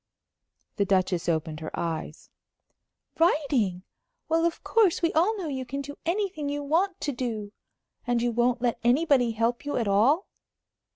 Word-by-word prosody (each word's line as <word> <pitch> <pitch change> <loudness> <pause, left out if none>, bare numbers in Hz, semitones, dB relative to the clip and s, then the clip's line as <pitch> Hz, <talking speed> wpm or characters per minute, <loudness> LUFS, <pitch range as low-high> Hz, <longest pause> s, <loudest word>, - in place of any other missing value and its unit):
The 200 - +2
Duchess 185 -3 +1
opened 160 -1 -1
her 155 - -5
eyes. 160 -2 -5 0.9
"Writing! 270 - +2 0.5
Well, 330 +1 +2
of 340 - -2
course, 400 -6 +2
we 335 - +2
all 390 +8 +2
know 365 -5 -4
you 265 -3 -3
can 275 +3 -4
do 285 +1 -8
anything 360 -5 -1
you 290 0 -3
want 350 +6 +1
to 290 - -1
do. 230 -5 -4 0.6
And 240 -1 +2
you 240 0 0
won't 240 +1 +1
let 240 -2 0
anybody 255 0 +3
help 230 +2 0
you 290 - -2
at 230 -4 0
all?" 240 - +3
255 Hz, 160 wpm, -27 LUFS, 210-320 Hz, 0.9 s, anybody